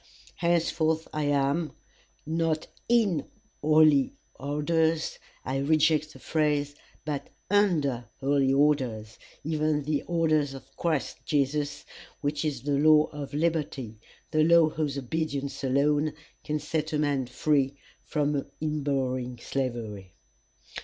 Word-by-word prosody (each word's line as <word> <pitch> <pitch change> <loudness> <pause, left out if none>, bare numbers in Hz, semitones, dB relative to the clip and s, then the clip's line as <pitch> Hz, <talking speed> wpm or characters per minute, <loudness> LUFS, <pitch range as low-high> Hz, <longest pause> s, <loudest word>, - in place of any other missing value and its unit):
Henceforth 160 -2 +1
I 150 -1 -1
am, 145 +3 +1 0.5
not 160 0 0 0.2
IN 210 - +3 0.4
HOLY 155 -2 +5 0.2
ORDERS, 160 +3 0 0.3
I 135 +1 -1
reject 155 +1 +2
the - - -12
phrase, 150 -2 0 0.3
but 145 -2 -3 0.2
UNDER 155 - +2
holy 135 -1 +2
orders, 130 -7 +1 0.2
even 155 -1 0
the 150 0 0
orders 155 -5 +1
of 135 - -13
Christ 160 -5 -1
Jesus, 145 0 0 0.3
which 145 +1 -1
is 150 -4 -2
the 140 -1 +1
law 155 0 +5
of 145 -1 -6
liberty, 150 -8 -1 0.3
the 155 -1 +3
law 165 0 +6
whose 150 -3 -2
obedience 140 +1 -3
alone 145 +3 +2 0.3
can 150 -1 -1
set 155 +1 -2
a - - +2
man 145 -4 0
free 140 +1 +1 0.2
from 145 -2 -1
in 155 -1 -1
burrowing 130 -3 -1
slavery. 115 -7 -4
150 Hz, 120 wpm, -28 LUFS, 140-155 Hz, 0.5 s, law